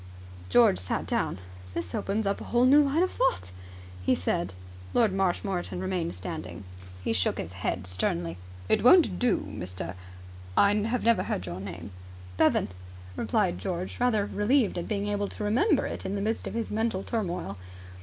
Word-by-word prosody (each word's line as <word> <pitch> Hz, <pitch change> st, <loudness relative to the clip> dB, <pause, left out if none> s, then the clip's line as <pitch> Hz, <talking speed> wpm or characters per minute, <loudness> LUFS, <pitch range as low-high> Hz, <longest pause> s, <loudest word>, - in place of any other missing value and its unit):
George 90 Hz, -3 st, +5 dB
sat 95 Hz, -, -2 dB
down. -, -, -1 dB, 0.4 s
"This 90 Hz, -, -4 dB
opens 205 Hz, +2 st, -1 dB
up 200 Hz, 0 st, -1 dB
a 240 Hz, +1 st, +2 dB
new 285 Hz, +3 st, +7 dB
line 290 Hz, +4 st, +2 dB
of 370 Hz, -, 0 dB
thought!" 90 Hz, -, 0 dB, 0.5 s
he -, -, +3 dB
said. 85 Hz, 0 st, -1 dB, 0.4 s
Lord 225 Hz, -5 st, +4 dB
Marshmoreton 190 Hz, -1 st, -1 dB
remained 185 Hz, -, -2 dB
standing. 90 Hz, +2 st, -6 dB, 0.4 s
He 115 Hz, -, 0 dB
shook 95 Hz, -4 st, +1 dB
his 85 Hz, -, -5 dB
head 95 Hz, 0 st, -2 dB
sternly. 90 Hz, -1 st, -1 dB, 0.3 s
"It -, -, +2 dB
won't 250 Hz, -, +6 dB
do, 245 Hz, -1 st, +2 dB
Mr.... 90 Hz, -1 st, -5 dB, 0.6 s
I 200 Hz, 0 st, +6 dB
have 225 Hz, +4 st, 0 dB
never 230 Hz, 0 st, +4 dB
heard 90 Hz, -, -2 dB
your 90 Hz, 0 st, -5 dB
name." 95 Hz, 0 st, -7 dB, 0.4 s
"Bevan," -, -, +3 dB, 0.5 s
replied 90 Hz, -, 0 dB
George, 180 Hz, -, -4 dB
rather 230 Hz, -5 st, +2 dB
relieved 210 Hz, -1 st, +1 dB
at 170 Hz, -, -5 dB
being 205 Hz, -1 st, -1 dB
able 205 Hz, 0 st, -1 dB
to 210 Hz, -, -6 dB
remember 280 Hz, -, +3 dB
it -, -, -5 dB
in 190 Hz, -, -3 dB
the 200 Hz, -, -2 dB
midst 220 Hz, +3 st, -1 dB
of -, -, -5 dB
his 230 Hz, -1 st, -2 dB
mental 220 Hz, -3 st, 0 dB
turmoil. 175 Hz, -, -3 dB
195 Hz, 165 wpm, -28 LUFS, -, 0.6 s, new